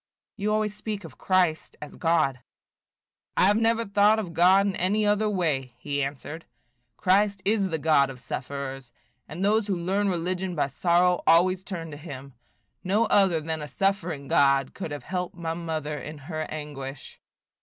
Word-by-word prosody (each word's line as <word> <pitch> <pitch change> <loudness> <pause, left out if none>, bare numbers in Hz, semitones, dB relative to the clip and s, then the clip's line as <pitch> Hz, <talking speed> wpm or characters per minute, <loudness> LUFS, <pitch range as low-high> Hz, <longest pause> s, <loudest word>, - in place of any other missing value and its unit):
"You 210 -1 -1
always 215 -1 0
speak 210 -1 -5
of 155 -6 -12
Christ 180 -4 +1
as 150 - -9
God." 155 -6 +1 1.0
"I - - +6
have 205 +2 +4
never 230 0 +2
thought 205 +2 +4
of 190 -6 -4
God 185 +4 +5
in 200 -1 -1
any 205 +4 +1
other 210 +1 +2
way," 145 - -1
he 145 +2 -2
answered. 145 +4 -5 0.5
"Christ 200 +1 +2
is 200 -2 +2
the 160 - -1
God 150 -3 +3
of 130 -2 -9
sufferers; 135 -1 -6 0.4
and 175 +5 -3
those 215 +1 +2
who 195 -3 0
learn 195 +4 0
religion 180 +1 -2
by 145 -3 0
sorrow 175 +4 +2
always 180 +2 +4
turn 170 -5 -6
to 145 - -8
him. 140 -4 -9 0.5
No 205 +5 +2
other 190 -6 +3
than 160 0 -4
a 150 - -5
suffering 175 -5 -1
God 135 -1 +3
could 190 - -5
have 145 -1 -6
helped 180 -1 -4
my 165 -2 -3
mother 155 -3 -4
in 150 +4 -8
her 155 +2 -5
anguish." 145 -3 -7
170 Hz, 170 wpm, -26 LUFS, 150-195 Hz, 1.0 s, I